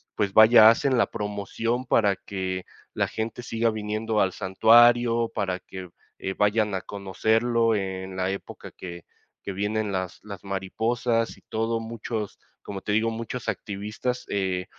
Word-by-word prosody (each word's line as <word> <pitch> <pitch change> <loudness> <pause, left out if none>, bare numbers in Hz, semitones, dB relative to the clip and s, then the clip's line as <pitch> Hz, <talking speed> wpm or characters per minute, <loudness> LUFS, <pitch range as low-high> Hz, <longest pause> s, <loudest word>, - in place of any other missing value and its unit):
pues, 100 -2 -1
vaya, 110 +1 +9
hacen 130 +3 +2
la 120 - +2
promoción 105 +4 -3
para 105 -5 +2
que 95 -2 -4 0.3
la - - 0
gente 115 +2 -5
siga 115 0 0
viniendo 110 +1 -2
al 95 -2 +2
santuario, 115 +4 +4
para 95 -4 -2
que, 95 -1 -9 0.3
eh, 95 - -3
vayan 105 0 +2
a 95 - -2
conocerlo, 110 +4 +1
eh, 95 -2 -3
en 95 0 -8
la 95 0 0
época 100 - -8
que 85 -2 -9 0.4
que 100 - -4
vienen 105 +2 -1
las 95 -1 -3
las 100 -4 -9
mariposas 115 +5 -1
y - - -20
todo. 115 +1 -1
Muchos, 115 -2 -5 0.3
como 100 -1 -6
te 105 - -3
digo, 110 +2 +2
muchos 115 +2 -5
activistas, 105 +4 -3
eh, 95 -2 -1
105 Hz, 155 wpm, -25 LUFS, 95-115 Hz, 0.4 s, vaya